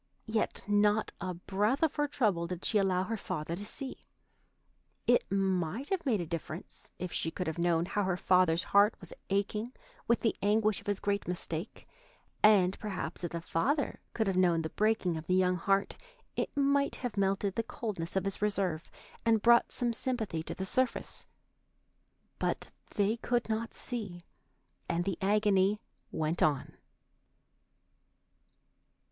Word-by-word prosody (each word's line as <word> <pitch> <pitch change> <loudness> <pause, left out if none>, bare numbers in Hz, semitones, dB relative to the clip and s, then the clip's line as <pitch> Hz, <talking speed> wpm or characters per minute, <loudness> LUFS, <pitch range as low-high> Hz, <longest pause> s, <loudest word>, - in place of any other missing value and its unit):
Yet 220 0 -1
not 205 +1 +3
a 180 -1 -3
breath 205 - 0
of 315 - +3
her 295 0 0
trouble 205 - +1
did 180 0 -5
she 215 - +3
allow 185 -2 +2
her 225 +3 -3
father 170 -4 -3
to 200 - -6
see. 265 +5 -3 1.1
It 245 -5 +3
might 195 - 0
have 365 -6 -1
made 225 -6 +3
a 175 - -2
difference 165 0 -6
if 180 0 -5
she 160 - -1
could 180 - -4
have 160 +1 -3
known 170 -1 +2
how 205 +3 -1
her 185 -1 0
father's 180 -2 +3
heart 205 +2 +4
was - - -9 0.2
aching 210 +4 -1 0.3
with 235 - +3
the 225 - +1
anguish 210 0 +2
of 200 - -19
his 205 -1 0
great 200 0 -1
mistake, 175 0 -4 0.5
and 195 -3 +5
perhaps 205 -3 -4
if 175 - -2
the 170 -1 -4
father 275 - 0 0.2
could 220 - +1
have 195 -2 0
known 175 -3 +3
the 160 - -4
breaking 210 -6 +1
of 160 +1 -8
the 185 - +3
young 185 -1 +3
heart 195 +3 +1 0.4
it - - -1
might 280 0 +2
have 245 -5 -4
melted 195 0 +1
the 230 - 0
coldness 205 -7 -5
of 190 - +1
his 195 0 -2
reserve 195 -6 0 0.3
and 225 -2 +3
brought 235 0 +6
some 240 -1 0
sympathy 225 -9 -2
to - - -5
the 190 - -3
surface. 255 +6 -1 1.1
But - - -1 0.2
they 210 +2 +2
could 240 0 0
not 225 +1 -2
see, 205 -8 -4 0.7
and 170 +1 0
the 195 -2 -2
agony 205 0 +3 0.3
went 160 +2 -1
on. 145 -4 +1
195 Hz, 160 wpm, -31 LUFS, 180-220 Hz, 1.1 s, brought